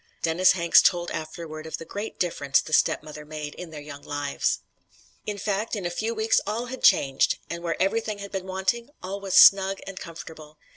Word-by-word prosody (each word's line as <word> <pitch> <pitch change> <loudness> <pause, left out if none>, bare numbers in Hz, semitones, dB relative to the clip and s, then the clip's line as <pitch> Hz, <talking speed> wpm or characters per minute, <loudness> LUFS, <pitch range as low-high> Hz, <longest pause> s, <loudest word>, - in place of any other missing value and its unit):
Dennis 170 +3 +4
Hanks 170 -2 +5
told 175 -1 +1
afterward 155 0 -6
of 160 - -4
the 165 - -9
great 205 +5 -6
difference 145 -6 +1
the 155 - -6
stepmother 150 0 +1
made 150 -1 -7
in 180 - -9
their 155 -2 -8
young 145 -1 -9
lives: 145 -1 -2 0.7
"In 210 -1 -3
fact, 205 +3 -2
in 200 -4 -5
a 175 - -1
few 220 +6 -2
weeks 220 0 +2
all 225 +4 -2
had 260 +1 -7
changed; 135 -8 +4
and 170 0 -4
where 170 -2 -3
everything 215 +2 0
had 200 0 -8
been 190 -1 -4
wanting, 190 +7 -1
all 195 +2 -5
was 195 -2 -2
snug 195 0 +7
and 195 -1 -7
comfortable. 160 -2 -10
180 Hz, 195 wpm, -25 LUFS, 155-200 Hz, 0.7 s, snug